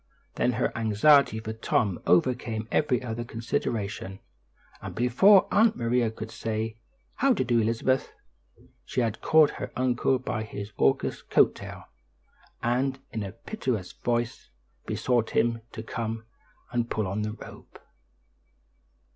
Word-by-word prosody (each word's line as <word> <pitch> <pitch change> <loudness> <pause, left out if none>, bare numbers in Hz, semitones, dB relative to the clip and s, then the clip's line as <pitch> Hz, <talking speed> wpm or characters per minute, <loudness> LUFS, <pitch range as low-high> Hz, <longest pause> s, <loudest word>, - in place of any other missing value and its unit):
Then 125 - +1
her 120 +2 -1
anxiety 115 +3 +4
for 110 0 -5
Tom 110 -4 0
overcame 115 +2 +1
every 130 -5 +1
other 120 -1 -4
consideration, 110 -4 -3 0.6
and - - -7
before 155 - +5
Aunt 220 +1 +4
Maria 120 0 +1
could 110 0 -8
say, 110 0 -3 0.4
"How 275 -1 +4
do - - -1
you - - -8
do, 120 -1 +2
Elizabeth?" 115 +4 0 0.7
she 125 - -1
had 115 -3 -2
caught 155 -2 +5
her - - -4
uncle 130 +1 +1
by 115 -3 -3
his 105 -1 -6
august 65 - +1
coat - - +5
tail - - -9 0.8
and 130 +3 +1
in 110 - -3
a 100 -2 -5
piteous 115 - -4
voice 120 +1 -2 0.4
besought 120 -3 0
him 115 -1 +2
to 110 - -7
come 115 -1 -4 0.5
and 120 -1 -1
pull 110 - -1
on 100 +3 -2
the 105 0 -2
rope. - - -12
115 Hz, 140 wpm, -27 LUFS, 110-125 Hz, 0.8 s, before